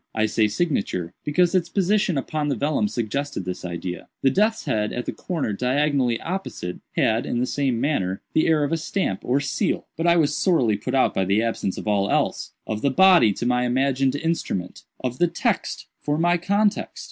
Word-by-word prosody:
I 110 -1 +2
say 110 0 +2
signature; 100 - -1
because 170 +4 +2
its 175 -2 +1
position 195 -2 +1
upon 150 +2 -2
the 140 - 0
vellum 140 -3 0
suggested 115 +1 -3
this 90 0 -5
idea. 90 0 -5 0.2
The 135 - +4
death's 215 +7 +1
head 105 -1 0
at 125 - -4
the - - -2
corner 160 - -3
diagonally 130 +1 +1
opposite, 170 - -5 0.2
had, 110 +2 +1
in - - -1
the 125 - +1
same 130 -3 -1
manner, 100 -9 -1
the 160 - +3
air 155 -2 +3
of 145 - -1
a 165 - +1
stamp, 165 - -2
or 130 +3 +1
seal. 140 - -1
But 165 +3 -1
I 170 - +5
was 150 -3 +2
sorely 135 - +2
put 105 +6 -3
out 130 - +3
by 95 - 0
the 100 +4 +2
absence 115 -4 -2
of - - -6
all 100 -1 +1
else—of 110 -1 -2
the 140 - +2
body 180 - +6
to 120 - -4
my 125 0 +2
imagined 135 +1 +1
instrument—of 130 - -4
the 175 - +4
text - - -2
for 150 0 -1
my 175 +2 +3
context." 200 +4 0
135 Hz, 195 wpm, -23 LUFS, 110-165 Hz, 0.2 s, body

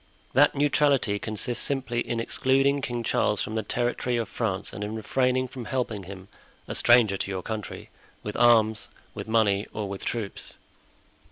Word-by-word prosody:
That 145 +3 +5
neutrality 140 -7 +2
consists 110 +3 -3
simply 130 -4 -1
in 120 -1 -2
excluding 135 +4 +2
King 120 -3 -3
Charles 105 -2 +1
from 110 - -5
the 110 - 0
territory 120 +2 -1
of 115 - -1
France 100 -5 -3
and 105 - -5
in 105 +2 -4
refraining 130 +3 0
from 125 -2 -8
helping 110 -6 -3
him—a 95 +1 -11
stranger 120 -5 +5
to - - -3
your 95 -2 -4
country—with 105 -1 -8
arms, 110 -2 +4 0.3
with - - -7
money 110 -2 +2
or 105 -2 -3
with 100 0 -6
troops. 110 -5 -4
115 Hz, 155 wpm, -26 LUFS, 105-125 Hz, 0.3 s, That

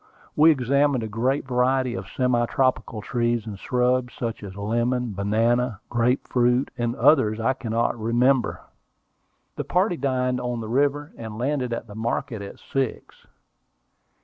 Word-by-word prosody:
We 155 +2 +6
examined 140 -2 +2
a - - -3
great 125 +6 -1
variety 130 0 +1
of 95 -1 -6
semi 120 -2 +1
tropical 120 -5 0
trees 120 -2 0
and 105 -3 -7
shrubs, 125 -1 0
such 115 -2 -4
as 100 -2 -8
lemon, 120 +3 -1
banana, 110 +3 +1
grape 120 +2 +1
fruit, 125 +1 +2
and 120 -1 -1
others 120 -5 +4
I 115 +4 +2
cannot 115 -2 -1
remember. 120 +3 +2 1.0
The - - -2
party 180 0 +1
dined 125 -2 0
on 125 -1 -3
the 110 -1 -6
river, 145 +3 0
and 110 -2 -7
landed 130 0 -1
at 115 - -3
the 105 - -12
market 115 +1 -3
at 100 - -8
six. 135 -4 -4
125 Hz, 150 wpm, -24 LUFS, 115-130 Hz, 1.0 s, We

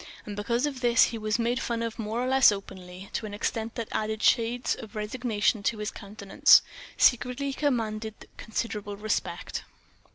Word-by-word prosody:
And 210 - -6
if - - -7
because 235 +5 0
of 275 -4 -4
this 240 0 +5
he 230 - -1
was 215 0 0
made 240 +1 0
fun 230 -1 -2
of 230 -1 -5
more 225 +3 -2
or - - -1
less 265 -3 +6
openly, 190 -1 -8
to 220 - -3
an 205 - -7
extent 220 +2 -3
that 230 -2 -4
added 215 +1 -2
shades 235 0 +2
of 220 - -9
resignation 215 0 0
to 220 +2 0
his 210 0 -3
countenance, 200 -1 +4 0.3
secretly 250 +2 +3
he - - -6
commanded 220 -6 -1 0.2
considerable 210 -2 -4
respect. 215 +1 -3
220 Hz, 175 wpm, -27 LUFS, 210-240 Hz, 0.3 s, less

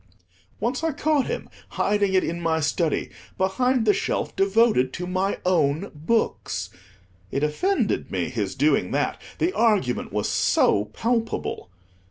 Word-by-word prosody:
Once 245 +7 -1
I 325 -2 +1
caught 295 -1 +1
him - - -4 0.3
hiding 205 -2 +2
it 185 - +4
in 170 +1 -3
my 165 -1 +1
study, 155 +1 0 0.3
behind 235 +6 +1
the 210 - +5
shelf - - -2
devoted 195 - +3
to 180 - -4
my 185 +2 -1
own 165 0 +1
books. 150 - -1 0.6
It 140 +8 -2
offended 370 - 0
me, - - -2
his - - -3
doing - - +2
that; - - -1 0.2
the 355 +3 0
argument 210 - +1
was 105 +1 -1
so 100 - +2
palpable. 230 - -2
190 Hz, 140 wpm, -24 LUFS, 155-230 Hz, 0.6 s, the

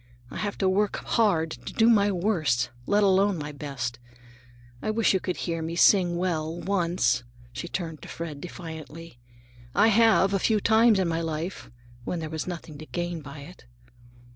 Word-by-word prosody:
I - - -6
have 205 -1 -3
to 190 - +1
work 200 +2 +1
hard 175 -9 +1
to 120 - -8
do 225 - +4
my 205 -3 +4
worst, 155 - 0 0.2
let 205 +1 +3
alone 195 0 +3
my 150 -1 -5
best. 135 -4 -5 0.8
I - - -2
wish 215 -1 +2
you 190 - +2
could 180 0 -3
hear 165 -2 -3
me 165 +1 -4
sing 175 -1 +4
well, 165 -2 -2
once," 175 -5 +1 0.3
she 170 - -5
turned 165 -3 -5
to - - -10
Fred 155 -4 -6
defiantly; 160 -4 -9 0.6
"I 210 +2 +5
have, 215 -3 +4
a 195 - +2
few 215 +2 +2
times 220 +1 +4
in 190 -2 +1
my 165 0 -1
life, 165 +3 -4 0.3
when 175 - -3
there 160 -2 -5
was 160 +1 -4
nothing 165 -4 -7
to 155 - -9
gain 175 -2 -3
by 140 0 -10
it." 140 -4 -13
175 Hz, 180 wpm, -26 LUFS, 155-200 Hz, 0.8 s, I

